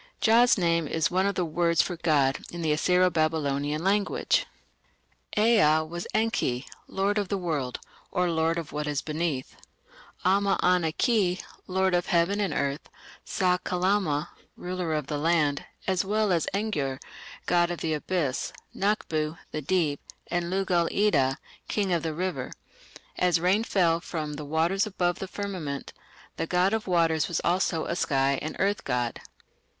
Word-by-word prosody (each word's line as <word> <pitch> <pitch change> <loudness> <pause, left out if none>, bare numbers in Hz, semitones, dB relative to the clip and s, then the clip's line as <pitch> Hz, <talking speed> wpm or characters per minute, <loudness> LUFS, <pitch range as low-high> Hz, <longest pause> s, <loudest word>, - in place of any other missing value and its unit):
Jah's 235 +2 +5
name 170 -3 +1
"is 160 +3 0
one 185 +2 +2
of 200 - -1
the 180 - 0
words 170 +1 +1
for 180 - -4
'god' 145 -5 +2
in 170 -1 -5
the 155 - +1
Assyro 180 +4 +3
Babylonian 150 -1 0
language". 200 +1 +1 0.9
Ea 210 -9 +5
was 175 +2 -6
"Enki", 180 - 0 0.2
"lord 200 +2 0
of 200 - -2
the 200 - -1
world", 150 -9 -2 0.3
or 180 -1 +1
"lord 165 +1 +1
of 165 -3 -5
what 150 +1 -3
is 145 -2 -1
beneath"; 155 -4 -3 0.7
Amma 195 +1 +3
ana 180 -3 +3
ki, 190 - +1 0.3
"lord 190 0 +1
of 175 0 +1
heaven 175 +4 +2
and 200 -2 0
earth"; 140 +1 -2 0.4
Sa 180 -1 +1
kalama, 180 -5 0 0.3
"ruler 180 -3 -3
of 150 -2 -2
the 145 0 -3
land", 150 -3 +1 0.2
as 190 -3 +1
well 210 +1 +1
as 170 -3 +1
Engur, 155 -11 -2 0.5
"god 175 -1 +3
of 175 - -4
the 160 -1 0
abyss", 150 -3 -1 0.2
Naqbu, 160 -6 -1
"the 155 - -3
deep", 155 -2 0 0.3
and 175 0 -1
Lugal 180 -2 +1
ida, 140 -11 +2 0.3
"king 200 -4 0
of 170 - +1
the 160 -1 -3
river". 175 -7 -3 0.7
As 180 -2 +3
rain 185 +6 +2
fell 170 -6 +2
from 155 -3 -4
"the 150 0 -6
waters 170 +8 +1
above 175 -3 -1
the 190 - -4
firmament", 180 -9 -5 0.4
the 165 - -2
god 180 +4 +2
of 220 -2 -1
waters 165 -3 +2
was 170 - -1
also 175 -2 +1
a 170 - -2
sky 135 -4 +1
and 155 - -4
earth 200 +1 0
god. 120 -1 -2
170 Hz, 160 wpm, -27 LUFS, 155-190 Hz, 0.9 s, Jah's